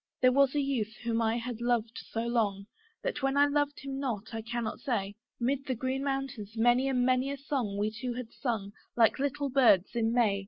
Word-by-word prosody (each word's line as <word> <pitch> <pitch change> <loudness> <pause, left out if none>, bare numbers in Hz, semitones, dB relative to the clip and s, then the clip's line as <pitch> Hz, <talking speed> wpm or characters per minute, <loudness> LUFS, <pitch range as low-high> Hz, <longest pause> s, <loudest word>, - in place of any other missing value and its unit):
There 255 0 +5
was 275 +1 +3
a - - +3
youth 265 -6 -1
whom 230 -1 0
I 225 +1 +1
had 235 -1 -5
loved 235 -2 0
so 225 - -2
long, 210 -5 0 0.4
That 295 - -2
when 270 +1 +1
I 285 - +7
loved 290 0 0
him 270 0 -5
not 225 -5 -3
I 225 - -3
cannot 230 0 -3
say. 205 -8 -2 0.3
'Mid 270 +3 -1
the 260 - 0
green 260 +3 -2
mountains 270 -6 -3
many 240 +3 +4
and 250 -2 +2
many 255 +1 +2
a 280 - -3
song 260 -7 -2
We 210 +1 0
two 240 +3 -4
had 245 -2 -6
sung, 220 -7 -3 0.2
like 230 +1 +4
little 285 0 -1
birds 235 -8 +5
in 225 -1 +1
May. 225 -5 +3
245 Hz, 210 wpm, -30 LUFS, 225-270 Hz, 0.4 s, I